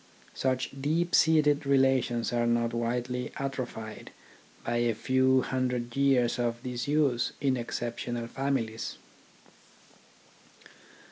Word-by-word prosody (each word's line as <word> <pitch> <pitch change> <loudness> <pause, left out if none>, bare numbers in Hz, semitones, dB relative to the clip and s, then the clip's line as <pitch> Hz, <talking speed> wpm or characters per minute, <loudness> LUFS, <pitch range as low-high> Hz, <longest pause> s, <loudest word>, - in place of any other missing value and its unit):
Such 130 -1 -1
deep 165 +5 0
seated 150 -2 +4
relations 130 -4 +2
are 120 0 +1
not 120 0 +1
widely 120 +2 -2
atrophied 130 -5 -5 0.5
by 120 - -1
a 120 -1 +1
few 130 +3 +3
hundred 125 -2 -2
years 135 -4 +2
of 120 0 -1
disuse 125 0 0
in 135 -2 +1
exceptional 120 0 -4
families. 115 -3 -2
125 Hz, 95 wpm, -29 LUFS, 120-135 Hz, 0.5 s, seated